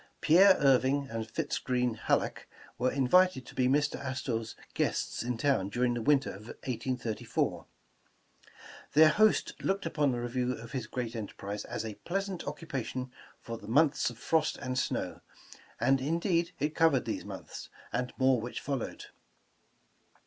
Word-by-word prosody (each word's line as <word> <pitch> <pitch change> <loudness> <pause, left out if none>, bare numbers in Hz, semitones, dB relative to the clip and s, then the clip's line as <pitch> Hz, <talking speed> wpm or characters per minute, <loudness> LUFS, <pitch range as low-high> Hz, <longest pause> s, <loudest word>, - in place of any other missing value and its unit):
Pierre 185 +4 +6
Irving 135 0 +3
and 115 -1 -4
Fitz 145 +6 -2
Greene 125 -2 0
Halleck 110 - -1 0.3
were 125 +1 +2
invited 140 +2 +3
to - - -12
be 130 -1 +2
Mr. 145 +3 +1
Astor 130 -3 -2
's 110 - -9 0.2
guests - - -1
in 125 0 -2
town 125 -7 +1
during 120 +3 +1
the 120 - -2
win 145 +4 +5
ter - - -6
of 105 +3 -12 0.2
1834. 125 -2 -2 1.3
Their 155 +2 +8
host 215 +6 +3
looked 195 -1 -1
upon 150 -4 +1
the 120 - -2
review 125 +1 -1
of 115 -1 -9
his 125 -4 -3
great 120 -1 -4
enterprise 105 -2 -5
as - - -4
a 110 - -4
pleasant 195 0 -3
occupation 135 -4 -4 0.3
for 115 -1 -6
the - - -12
months 140 +4 +3
of 120 - -11
frost 160 +5 +1
and 130 -2 -4
snow, - - -2 0.6
and 130 +3 +3
indeed 170 +4 +1
it 150 +2 -1
covered 160 -7 +3
these - - -3
months, - - -8 0.2
and 125 +1 -1
more 130 -3 +3
which 120 +2 -5
followed. 135 -4 -4
130 Hz, 155 wpm, -30 LUFS, 120-150 Hz, 1.3 s, Their